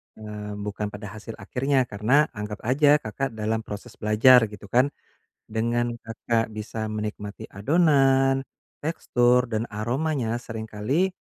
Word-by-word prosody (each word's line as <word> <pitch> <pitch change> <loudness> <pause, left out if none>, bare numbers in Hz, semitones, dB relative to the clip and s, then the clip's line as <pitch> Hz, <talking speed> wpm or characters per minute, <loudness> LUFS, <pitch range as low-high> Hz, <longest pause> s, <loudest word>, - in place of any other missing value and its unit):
eee, 105 -1 -7
bukan 105 0 -4
pada 105 -1 -8
hasil 110 +1 -8
akhirnya, 135 +1 0
karena 125 +7 +2
anggap 105 -2 -6
aja 145 +5 +5
Kakak 135 -1 -3
dalam 110 +1 -1
proses 105 -2 -9
belajar 115 +3 +6
gitu 105 -1 -12
kan, 125 +3 +4 0.6
dengan 120 +2 0
Kakak 115 0 -1
bisa 110 +1 -5
menikmati 105 -1 -5
adonan, 135 - +3 0.4
tekstur, 125 -5 +2
dan 110 0 -1
aromanya 120 +2 -1
seringkali 115 - -1
115 Hz, 125 wpm, -25 LUFS, 105-135 Hz, 0.6 s, belajar